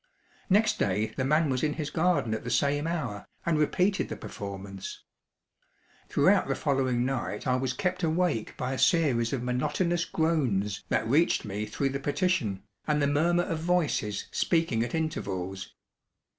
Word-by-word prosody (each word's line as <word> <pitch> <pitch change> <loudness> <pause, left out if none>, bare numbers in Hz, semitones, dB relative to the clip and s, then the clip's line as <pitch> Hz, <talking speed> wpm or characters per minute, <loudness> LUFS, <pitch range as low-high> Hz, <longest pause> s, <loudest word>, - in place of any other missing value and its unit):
Next 210 +3 +3
day 105 +3 0
the 130 - -1
man 155 +4 +3
was 130 -2 0
in 150 -1 +1
his 150 -2 -4
garden 165 -9 +1
at 110 - -3
the 120 - -4
same 140 +5 +1
hour, 130 -12 -3 0.2
and 165 -2 +2
repeated 185 +6 +1
the - - -4
performance. 100 -1 -7 1.1
Throughout - - +4
the - - 0
following 130 -3 +1
night 125 -5 -3
I 125 - +2
was 130 0 0
kept 180 +7 -1
awake 160 -8 0
by 130 +1 -2
a 130 - -3
series 135 - +3
of 130 -3 -2
monotonous 170 +8 0
groans 115 -12 0
that 110 - +1
reached 150 +4 +3
me 105 +1 -3
through 135 +6 -1
the 135 +1 -3
partition, 140 - 0 0.2
and 150 -1 +2
the 145 - +2
murmur 165 +5 +2
of 165 -2 -3
voices 160 - 0
speaking 165 -9 +1
at 120 - -3
intervals. 95 - -3
135 Hz, 160 wpm, -28 LUFS, 110-165 Hz, 1.1 s, Throughout